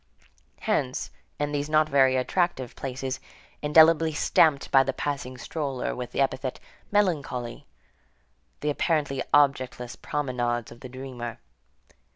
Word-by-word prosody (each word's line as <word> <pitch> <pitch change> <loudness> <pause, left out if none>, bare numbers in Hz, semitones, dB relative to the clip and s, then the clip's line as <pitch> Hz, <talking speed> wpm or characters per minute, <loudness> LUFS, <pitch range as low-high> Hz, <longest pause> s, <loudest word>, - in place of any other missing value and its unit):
Hence, 130 -2 -1 0.3
in 145 0 -1
these 145 0 -2
not 155 0 +4
very 135 -2 +4
attractive 130 -1 0
places, 130 0 -4 0.4
indelibly 160 +1 +5
stamped 150 -1 +3
by 135 - +7
the 135 0 -1
passing 140 -3 -3
stroller 135 -1 -3
with 125 -1 -6
the - - 0
epithet: 130 -1 -1 0.3
melancholy, 145 - -1 0.9
the 150 - +1
apparently 145 -3 0
objectless 130 -4 +2
promenades 120 -5 -2
of 120 - -12
the 130 - -9
dreamer. 125 -2 -6
135 Hz, 120 wpm, -26 LUFS, 125-150 Hz, 0.9 s, by